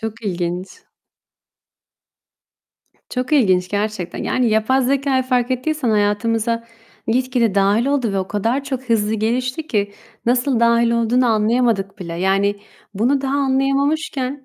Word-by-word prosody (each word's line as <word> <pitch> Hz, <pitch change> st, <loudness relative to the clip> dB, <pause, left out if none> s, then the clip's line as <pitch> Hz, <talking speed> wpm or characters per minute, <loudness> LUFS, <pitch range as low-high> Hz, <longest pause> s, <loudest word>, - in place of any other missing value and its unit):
Çok 225 Hz, +1 st, -6 dB
ilginç. 180 Hz, -1 st, -3 dB, 2.4 s
Çok 250 Hz, +2 st, -3 dB
ilginç 185 Hz, -10 st, +3 dB
gerçekten. 205 Hz, -3 st, -3 dB
Yani, 250 Hz, -2 st, +1 dB
yapay 220 Hz, +5 st, +2 dB
zekâyı 270 Hz, 0 st, +1 dB
fark 250 Hz, -1 st, 0 dB
ettiysen 255 Hz, 0 st, -1 dB
hayatımıza 225 Hz, +2 st, 0 dB, 0.4 s
gitgide 245 Hz, -3 st, +1 dB
dâhil 200 Hz, +4 st, +2 dB
oldu 265 Hz, -7 st, 0 dB
ve 195 Hz, -, 0 dB
o 190 Hz, -, -3 dB
kadar 230 Hz, +7 st, -1 dB
çok 265 Hz, -2 st, -4 dB
hızlı 220 Hz, -2 st, +1 dB
gelişti 250 Hz, +7 st, -1 dB
ki, 205 Hz, -6 st, -1 dB, 0.3 s
nasıl 245 Hz, 0 st, +2 dB
dâhil 235 Hz, 0 st, +3 dB
olduğunu 235 Hz, +2 st, +2 dB
anlayamadık 220 Hz, -3 st, +1 dB
bile. 170 Hz, -3 st, -6 dB
Yani, 195 Hz, +3 st, +1 dB, 0.4 s
bunu 250 Hz, +8 st, +1 dB
daha 275 Hz, 0 st, -2 dB
anlayamamışken 275 Hz, 0 st, 0 dB
235 Hz, 125 wpm, -19 LUFS, 205-260 Hz, 2.4 s, ilginç